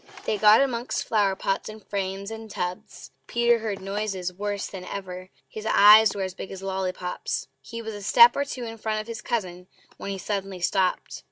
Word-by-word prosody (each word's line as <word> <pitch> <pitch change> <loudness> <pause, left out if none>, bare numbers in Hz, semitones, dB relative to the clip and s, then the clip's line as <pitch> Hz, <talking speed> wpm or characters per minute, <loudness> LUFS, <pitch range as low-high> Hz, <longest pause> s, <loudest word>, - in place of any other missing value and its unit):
They 210 - -1
got 215 +4 +7
amongst 245 -3 -1
flower 205 -3 +2
pots, 195 +2 -2
and 215 0 -11
frames, 195 +1 -3
and 225 0 -8
tubs. 180 -2 -6 0.2
Peter 235 0 +3
heard 215 -3 -3
noises 195 -2 -3
worse 205 +1 -3
than 190 -2 -8
ever; 185 -1 -7 0.2
his 215 0 -7
eyes 210 +1 +7
were 195 - -2
as 185 -1 -4
big 190 - -8
as 195 0 -8
lolly 190 -1 -1
pops! 180 -1 -4
He 230 0 -8
was 220 0 -5
a 205 - -8
step 470 - +7
or 280 - +1
two 265 -3 -6
in 225 -1 -7
front 215 0 -1
of 215 - -5
his 230 -1 -7
cousin 180 -5 -3 0.3
when - - -6
he 195 - -3
suddenly 195 -1 -4
stopped. 185 +1 0
200 Hz, 200 wpm, -25 LUFS, 190-220 Hz, 0.3 s, got